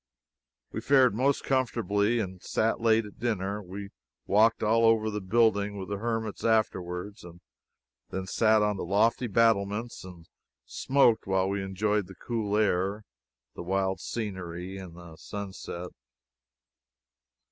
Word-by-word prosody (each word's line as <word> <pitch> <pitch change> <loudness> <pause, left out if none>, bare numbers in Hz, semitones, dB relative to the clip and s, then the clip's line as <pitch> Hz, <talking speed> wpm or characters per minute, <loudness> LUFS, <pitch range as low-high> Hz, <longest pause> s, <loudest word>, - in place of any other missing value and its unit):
We - - -4
fared 130 -5 +4
most 135 +5 +1
comfortably, 115 -4 +1
and 95 -5 -4
sat 115 +1 0
late 115 -1 +3
at 105 - -13
dinner. 105 -3 -2
We 100 +1 -8 0.4
walked 110 +3 +3
all 115 +2 +3
over 110 -1 +3
the 105 0 -3
building 100 0 +2
with 95 0 -6
the 100 -1 -3
hermits 115 -1 -3
afterward, 100 -3 0
and 85 0 -12 0.7
then 95 0 -4
sat 110 +3 +3
on 105 -1 0
the - - -4
lofty 110 +7 +2
battlements 115 +1 +1
and 90 -3 -12 0.4
smoked 120 - +2
while 95 -1 +1
we 100 0 -1
enjoyed 100 +1 -1
the 95 - -12
cool 105 -1 -2
air, 100 0 +1 0.5
the - - -8
wild 95 +1 -1
scenery 95 -4 -5
and 90 -3 -9
the 85 -2 -12
sunset. 95 -3 -7
105 Hz, 135 wpm, -28 LUFS, 95-115 Hz, 0.7 s, fared